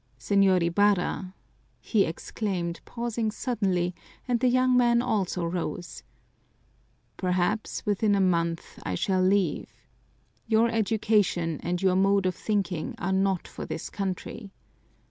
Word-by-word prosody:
"Señor 195 -3 +3
Ibarra," 185 +1 +1 0.4
he 210 -4 +2
exclaimed, 170 0 -3
pausing 235 -2 -2
suddenly, 195 -7 -1 0.3
and 245 -2 +1
the 255 - +2
young 255 0 +3
man 240 -1 +4
also 195 -7 -1
rose, 175 0 -4 1.2
"perhaps 185 +4 -1
within 205 0 +2
a - - +2
month 170 -3 0
I 95 - -3
shall 185 - +1
leave. 185 -3 +1 0.8
Your 225 +1 +3
education 210 -7 +1
and 180 +2 -2
your 185 -1 +3
mode 195 0 +3
of 185 - +1
thinking 190 -5 -2
are 190 +2 -1
not 190 -1 +1
for - - -8
this - - -5
country. 195 +2 -5
195 Hz, 125 wpm, -27 LUFS, 180-220 Hz, 1.2 s, man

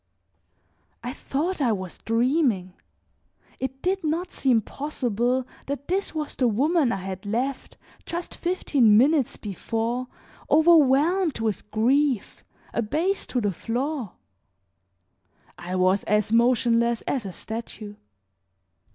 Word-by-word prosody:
I 245 +2 -4
thought 310 +5 -2
I 245 -4 +3
was 185 -4 -4
dreaming; 230 - +1 0.9
it 265 +1 -5
did 380 0 0
not 325 +4 -1
seem 255 -4 +2
possible 250 -3 -1 0.2
that 280 0 -4
this 380 -2 -1
was 305 -1 -3
the 255 - +2
woman 280 +5 +2
I - - 0
had 190 0 -6
left, 250 +6 -2 0.3
just 345 0 -5
fifteen 280 - +3
minutes 275 +2 +3
before, 230 +4 -3 0.4
overwhelmed 315 +1 +4
with 220 -2 -2
grief, 255 +2 +1 0.3
abased 320 - -1
to 250 - 0
the 205 -2 +1
floor; 245 - -3 1.5
I 175 +1 -4
was 185 +2 +3
as 210 0 +1
motionless 235 0 +3
as 260 -4 -1
a 195 - -6
statue. 220 +1 -7
250 Hz, 115 wpm, -25 LUFS, 220-300 Hz, 1.5 s, overwhelmed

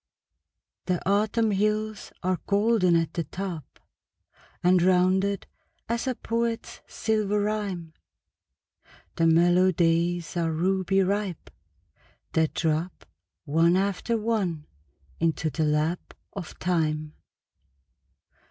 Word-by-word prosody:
The 180 -2 +1
Autumn 215 +2 +2
hills 215 +1 -1
are 185 0 0
golden 205 -3 +3
at 165 -1 +1
the 170 - -1
top, 170 -2 -7 0.8
And 180 0 +5
rounded 185 +2 +2 0.4
as 235 +3 -2
a 255 - 0
poet's 230 0 -3
silver 210 -2 0
rhyme; 200 -6 -2 1.2
The 165 - +3
mellow 175 +3 +5
days 170 0 +1
are 165 -2 0
ruby 190 +3 +1
ripe, 195 -2 -2 0.8
that 160 -1 +1
drop 160 +2 -1 0.4
One 165 +4 +3
after 200 +4 0
one 205 -9 -1 0.5
into 160 -1 0
the 160 +1 0
lap 150 +3 -1 0.2
of 190 -5 -7
time. 155 -3 -1
180 Hz, 100 wpm, -26 LUFS, 165-205 Hz, 1.2 s, And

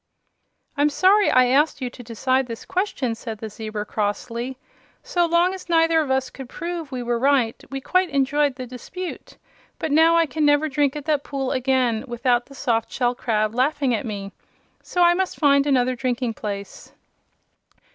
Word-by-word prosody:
"I'm 290 +1 +3
sorry 390 +7 +4
I 255 0 +5
asked 280 +5 +2
you 250 -2 -4
to 250 - -11
decide 255 +3 0
this 230 -1 -7
question," 360 - -1
said 225 -1 -7
the 220 0 -7
zebra, 215 0 -5
crossly. 230 +5 -3 0.5
"So 355 -9 +1
long 340 +2 +3
as 375 -2 -9
neither 330 -1 +4
of 295 - -3
us 265 -1 0
could 265 -2 -10
prove 335 -2 -5
we 250 -2 -4
were 240 0 -1
right 260 -3 +1
we 270 0 -5
quite 370 +5 +1
enjoyed 285 0 +1
the 255 -1 -6
dispute; 295 +9 -8 0.4
but 315 - -3
now 325 +3 +5
I 335 0 +4
can 315 0 -2
never 290 +1 +4
drink 285 -1 +1
at 295 -2 -6
that 300 -3 +1
pool 270 -2 -3
again 255 -3 +1
without 240 0 0
the 275 - -14
soft 230 -3 -1
shell 245 -2 0
crab 215 -3 -1
laughing 265 +1 +1
at 230 - -2
me. 200 -2 -5 0.5
So 355 - 0
I 345 0 +6
must 375 +1 -2
find 280 -2 +4
another 255 -2 +2
drinking 250 -2 -2
place." 200 -2 -7
265 Hz, 180 wpm, -23 LUFS, 240-305 Hz, 0.5 s, I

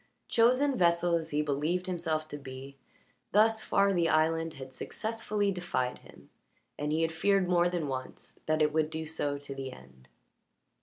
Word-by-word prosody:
Chosen 255 +4 +3
vessel 170 0 +3
as 165 -1 0
he 150 0 0
believed 155 +5 -1
himself 165 -4 -2
to 145 - -6
be, 135 0 -9 0.6
thus 220 +2 +4
far 200 0 +3
the 170 -2 +2
island 160 +1 +2
had 130 -1 -9
successfully 215 - -2
defied 155 -9 -2
him, - - -17 0.4
and 150 0 -3
he 160 +1 +1
had 165 - +1
feared 195 +3 +2
more 175 -1 +3
than 175 -4 -2
once 130 -1 -7
that 155 0 +3
it 150 0 +1
would 155 -1 +2
do 160 0 -4
so 145 -2 -2
to 140 -1 -8
the 135 -1 -5
end. 65 - -16
160 Hz, 170 wpm, -30 LUFS, 145-180 Hz, 0.6 s, thus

